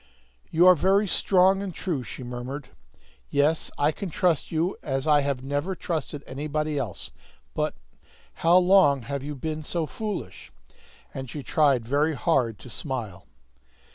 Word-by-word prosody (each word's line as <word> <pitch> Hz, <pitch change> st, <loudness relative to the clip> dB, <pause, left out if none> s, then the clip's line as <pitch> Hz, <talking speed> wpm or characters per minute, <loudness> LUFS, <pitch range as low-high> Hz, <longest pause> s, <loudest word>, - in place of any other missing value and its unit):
"You 170 Hz, +2 st, +4 dB
are 185 Hz, -, +9 dB
very 195 Hz, +5 st, +3 dB
strong 190 Hz, 0 st, +3 dB
and 200 Hz, -2 st, -4 dB
true," 170 Hz, -8 st, -2 dB
she 125 Hz, -, -8 dB
murmured. 125 Hz, +3 st, -6 dB, 0.6 s
"Yes, 150 Hz, +3 st, +1 dB
I 145 Hz, +2 st, +3 dB
can 190 Hz, +4 st, -6 dB
trust 170 Hz, -1 st, 0 dB
you 165 Hz, +3 st, 0 dB
as 135 Hz, -2 st, -2 dB
I 150 Hz, -1 st, +5 dB
have 140 Hz, -2 st, -2 dB
never 145 Hz, +7 st, -2 dB
trusted 155 Hz, -4 st, -4 dB
anybody 150 Hz, +2 st, -2 dB
else! 115 Hz, -9 st, -5 dB, 0.4 s
But -, -, -1 dB, 0.6 s
how 170 Hz, +2 st, +4 dB
long 180 Hz, -8 st, +5 dB
have 140 Hz, +2 st, -4 dB
you 145 Hz, +2 st, -5 dB
been 155 Hz, +3 st, -4 dB
so 165 Hz, +2 st, -2 dB
foolish?" 210 Hz, +7 st, -6 dB, 0.6 s
And 130 Hz, -2 st, -6 dB
she 145 Hz, +1 st, -6 dB
tried 135 Hz, -7 st, +2 dB
very 145 Hz, +4 st, +1 dB
hard 120 Hz, -4 st, +1 dB
to -, -, -11 dB
smile. 115 Hz, -, -3 dB
150 Hz, 150 wpm, -26 LUFS, 135-170 Hz, 0.6 s, are